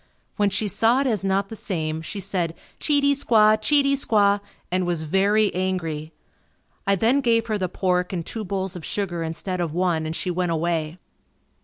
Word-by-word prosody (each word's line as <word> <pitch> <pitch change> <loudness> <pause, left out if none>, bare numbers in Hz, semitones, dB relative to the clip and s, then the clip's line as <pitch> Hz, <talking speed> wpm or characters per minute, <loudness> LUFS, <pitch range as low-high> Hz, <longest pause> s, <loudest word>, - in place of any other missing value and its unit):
When 205 -2 +2
she 200 +2 -1
saw 230 +6 +3
it - - -1
as 220 -7 0
not 195 0 0
the 225 - -7
same, 160 -7 -3
she 200 +5 -6
said, 180 -4 -2 0.2
"Cheatey 285 -2 +3
Squaw, 220 -6 +4
Cheatey 280 +3 +3
squaw," 205 -7 +3 0.3
and 180 0 0
was 170 -3 -1
very 200 +6 +2
angry. 165 -4 -2 0.8
I 200 - +4
then 235 +8 +2
gave 230 -3 +2
her 215 -2 -2
the 185 -1 -1
pork 180 -1 0
and 170 -4 -3
two 225 - -4
bowls 190 -1 -3
of 175 - -7
sugar 180 -3 -3
instead 170 +3 -3
of 165 -2 -3
one 175 -3 0
and 160 - -4
she 180 - -2
went 180 0 -1
away. 165 0 -1
190 Hz, 185 wpm, -23 LUFS, 175-215 Hz, 0.8 s, Squaw